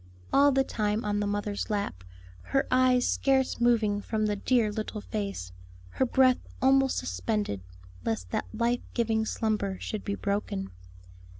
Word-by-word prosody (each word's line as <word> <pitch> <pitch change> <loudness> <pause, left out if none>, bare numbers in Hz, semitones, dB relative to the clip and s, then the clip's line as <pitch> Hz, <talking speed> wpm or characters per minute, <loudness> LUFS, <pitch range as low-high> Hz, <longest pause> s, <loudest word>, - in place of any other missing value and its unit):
All 285 +1 +6
the 270 0 +3
time 210 -3 -1
on 205 0 0
the 205 - 0
mother's 205 +1 -2
lap, 200 - -2 0.5
her 270 - +3
eyes 255 -1 +4
scarce 265 -3 +1
moving 220 -4 +3
from 215 +1 -1
the 210 -1 0
dear 225 +1 +2
little 215 0 -4
face; 200 - -4 0.4
her 260 - 0
breath 255 0 +4 0.2
almost 270 0 +4
suspended, 210 - -2 0.4
lest 90 -5 -3
that - - -1
life 235 +2 0
giving 225 -2 +1
slumber 210 -4 -1
should 215 - -4
be 200 - -2
broken. 200 - -2
215 Hz, 145 wpm, -28 LUFS, 205-245 Hz, 0.5 s, All